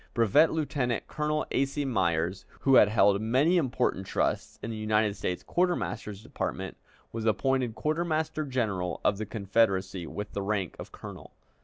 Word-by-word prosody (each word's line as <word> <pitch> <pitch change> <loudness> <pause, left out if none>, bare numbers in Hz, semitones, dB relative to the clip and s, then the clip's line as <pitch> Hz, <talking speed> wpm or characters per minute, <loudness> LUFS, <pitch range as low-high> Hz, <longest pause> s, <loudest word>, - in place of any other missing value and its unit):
Brevet 120 +8 +5
Lieutenant 140 -7 -1
Colonel 150 0 -1
A. 135 - +3
C. 140 +1 -2
Myers, 90 -6 0 0.2
who 135 - +3
had 105 - +8
held 100 -2 +4
many 135 +11 +3
important 125 - 0
trusts - - -1
in 115 - -3
the - - -4
United 110 -1 +1
States 90 -2 -3
Quartermaster's 170 - -1
Department, - - -4 0.4
was 115 -1 -4
appointed 125 +1 +1
Quartermaster 155 0 -1
General 110 -10 -2
of 100 - +2
the 110 - -4
Confederacy, 100 -4 0
with 105 +4 -6
the 100 - -2
rank 100 -3 -2
of - - -8
colonel. - - -10
110 Hz, 155 wpm, -28 LUFS, 100-140 Hz, 0.4 s, had